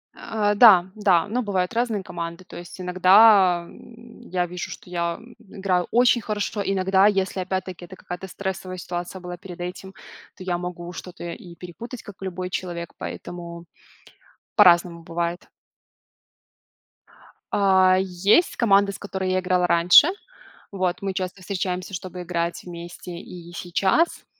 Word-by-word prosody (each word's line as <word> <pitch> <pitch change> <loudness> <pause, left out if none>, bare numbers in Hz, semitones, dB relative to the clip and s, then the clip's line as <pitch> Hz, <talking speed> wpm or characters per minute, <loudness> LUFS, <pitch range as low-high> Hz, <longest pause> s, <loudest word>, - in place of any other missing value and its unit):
Э, 210 -2 -1
да, 200 -6 +8
да, 200 -4 +3
но 245 +4 -1
бывают 190 -2 -1
разные 225 -4 -1
команды. 170 +1 -6
То - - -11
есть 175 +2 -10
иногда, 185 0 +5
м, 235 0 -15
я 180 0 0
вижу, 180 +1 -6
что - - -10
я 170 -1 -2 0.2
играю 190 -4 -2
очень 240 0 +4
хорошо, 210 0 -3
иногда, 190 +1 +3
если 195 -2 0
опять-таки 185 -1 -4
это 185 - -12
какая-то 180 +1 -8
стрессовая 190 -1 -5
ситуация 175 +1 -5
была 180 0 -7
перед 175 -1 -11
этим, 185 +2 -7 0.4
то 185 - -10
я 175 -2 -1
могу 175 0 -6
что-то 180 0 -9
и 170 0 -8
перепутать, 220 +8 -9
как 205 - -11
и - - -5
любой 185 0 -4
человек. 175 -2 -5
Поэтому 170 -1 -8 0.9
по-разному 170 -1 +5
бывает. 170 +1 -4 2.1
А, 190 -2 +4
есть 190 - +2
команда, 200 -3 +4
с - - -8
которой 190 -2 -4
я 185 - +2
играла 180 -1 +1
раньше. 175 - +7 0.6
Вот, 185 -1 -2
мы 195 -1 -2
часто 185 0 -4
встречаемся, 185 0 -3
чтобы 180 0 -6
играть 170 -1 -3
вместе 175 0 -9
и 175 -1 -11
сейчас, 190 - 0
185 Hz, 145 wpm, -23 LUFS, 175-195 Hz, 2.1 s, да